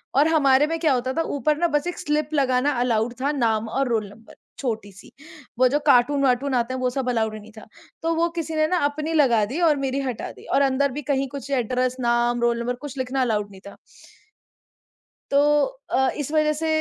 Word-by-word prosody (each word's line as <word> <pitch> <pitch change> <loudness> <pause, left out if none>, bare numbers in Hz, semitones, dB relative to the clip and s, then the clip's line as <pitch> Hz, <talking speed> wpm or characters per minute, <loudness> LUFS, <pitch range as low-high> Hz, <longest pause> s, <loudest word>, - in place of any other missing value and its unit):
और 290 +4 +5
हमारे 290 -2 +4
में 330 +1 -2
क्या 315 -4 +2
होता 255 +1 -1
था 330 - 0 0.2
ऊपर 300 +3 +1
ना 345 +1 +2
बस 295 +2 -1
एक 355 - -4
स्लिप 300 0 -1
लगाना 270 0 +2
अलाउड 235 -1 0
था 285 +2 +1
नाम 225 -5 0
और 270 +3 0
रोल 220 -3 0
नंबर 225 +2 -16 0.2
छोटी-सी। 215 -6 -5 0.5
वो 255 - +6
जो 290 +4 +1
कार्टून-वार्टून 270 0 +3
आते 240 +1 0
हैं 260 - -3
वो 255 - +1
सब 255 0 -2
अलाउड 220 -2 0
ही 215 - -7
नहीं 215 +1 -14
था। 215 - -11 0.4
तो 330 0 0
वो 335 +1 +1
किसी 320 -1 -3
ने 310 0 +2
ना 360 +1 +1
अपनी 305 +3 -2
लगा 245 -8 +3
दी 270 +11 -5
और 300 - +3
मेरी 270 0 -2
हटा 255 -4 -4
दी। - - -16
और 275 - +1
अंदर 275 0 +2
भी 295 +3 -5
कहीं 275 0 0
कुछ 280 +1 -8
एड्रेस, 255 0 0
नाम, 240 0 +1
रोल 235 0 +1
नंबर 245 +1 -2
कुछ 275 - -10
लिखना 260 +1 -1
अलाउड 210 -4 -1
नहीं 190 - -14
था। - - -11 1.6
तो 280 - +3 0.5
अ, 265 0 +2
इस 295 0 -4
वज़ह 305 -1 +2
से 320 +2 -3
265 Hz, 220 wpm, -23 LUFS, 240-295 Hz, 1.6 s, वो